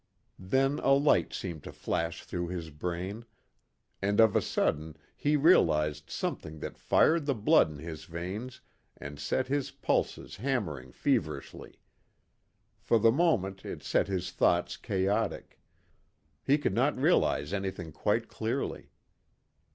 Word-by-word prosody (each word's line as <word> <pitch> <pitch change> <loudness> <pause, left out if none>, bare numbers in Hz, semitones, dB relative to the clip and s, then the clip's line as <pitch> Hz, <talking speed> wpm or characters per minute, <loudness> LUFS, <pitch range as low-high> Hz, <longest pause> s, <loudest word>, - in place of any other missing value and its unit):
Then 135 +9 +1
a 135 - +4
light 140 +2 +3
seemed 85 -5 -5
to - - -7
flash 85 0 -3
through 85 -1 -4
his 85 -3 -5
brain, 90 +8 -4 0.8
and 100 +2 +1
of 110 -2 +6
a - - +4
sudden 80 +1 -1 0.2
he 150 +1 +1
realized 75 - +3
something 80 +3 -4
that - - -5
fired 160 -2 +3
the 140 - +2
blood 105 -6 +4
in 75 - -9
his 80 +1 -8
veins 95 +9 -6 0.4
and 70 0 -8
set 75 - 0
his 140 +1 -1
pulses - - -2
hammering 95 - -2
feverishly. 75 +2 -2 1.0
For 115 - +2
the 115 +1 +5
moment 110 - +1
it - - -7
set - - +1
his 95 -3 -2
thoughts - - +2
chaotic; 95 +1 -1 0.8
he 140 +2 +4
could 145 - -1
not - - +2
realize 75 +6 +2
anything 95 -4 -3
quite - - 0
clearly. - - -3
95 Hz, 135 wpm, -30 LUFS, 80-125 Hz, 1.0 s, of